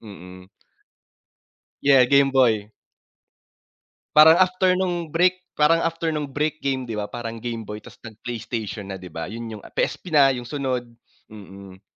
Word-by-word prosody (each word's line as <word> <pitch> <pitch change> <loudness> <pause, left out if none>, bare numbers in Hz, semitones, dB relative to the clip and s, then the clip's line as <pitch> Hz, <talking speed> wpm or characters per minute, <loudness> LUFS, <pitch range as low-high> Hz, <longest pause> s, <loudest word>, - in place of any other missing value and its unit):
mhm. 95 -3 -13 1.3
Yeah 135 -2 +6
Game 140 +1 +4
Boy. 115 -6 +2 1.5
Parang 155 +1 +9
after 185 0 +2
nung 175 -2 -1
Brick, 185 +1 +2
parang 150 +2 +4
after 165 0 -2
nung 150 -2 -3
Brick 150 +3 -2
game 135 -2 -2
di 110 -2 -4
ba 105 - -2
parang 115 0 -7
Game 115 0 -5
Boy 105 0 -7
tapos - - -16
nag 110 -1 -11
Playstation 110 -3 -5
na 95 - -5
di 90 - -11
ba. 80 - -6
Yun 115 0 -7
yung - - -17
PSP 180 - -3
na 140 -3 +5
yung 125 - -5
sunod, 130 -3 -2 0.5
mm. 100 -2 -12
125 Hz, 155 wpm, -23 LUFS, 105-155 Hz, 1.5 s, Parang